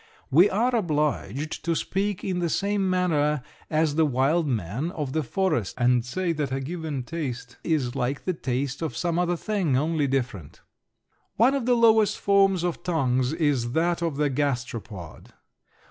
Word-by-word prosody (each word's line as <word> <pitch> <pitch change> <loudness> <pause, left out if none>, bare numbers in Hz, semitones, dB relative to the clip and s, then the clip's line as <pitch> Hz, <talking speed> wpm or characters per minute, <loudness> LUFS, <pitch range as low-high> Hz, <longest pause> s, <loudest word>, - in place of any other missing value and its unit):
We 175 +9 +6
are 240 +5 +1
obliged 150 - -1
to 170 0 0
speak 195 +4 -2
in 185 -2 -1
the 170 -1 0
same 200 +1 0
manner 150 -6 +1 0.3
as 155 -1 +1
the 160 +1 +3
wild 145 +5 +1
man 120 - -2
of 145 -6 -4
the 160 - +1
forest 155 - -1
and 120 -1 +3
say 170 +8 -1
that 145 -4 -2
a 135 - -1
given 155 -2 -4
taste 125 -5 -5
is 145 -7 0
like 130 +3 -2
the 185 - 0
taste 135 -1 -3
of 155 -8 -3
some 170 -1 0
other 175 0 +1
thing, 185 -10 0
only 155 0 +1
different. 125 - -3 0.7
One 240 +5 +4
of 270 -4 -1
the 250 - +4
lowest 220 -3 +4
forms 195 -3 +3
of 175 -1 -2
tongues 130 -7 +1
is 145 -7 0
that 170 +2 +1
of 165 -4 -1
the 145 -1 +1
gasteropod. 120 - -4
155 Hz, 165 wpm, -25 LUFS, 130-180 Hz, 0.7 s, We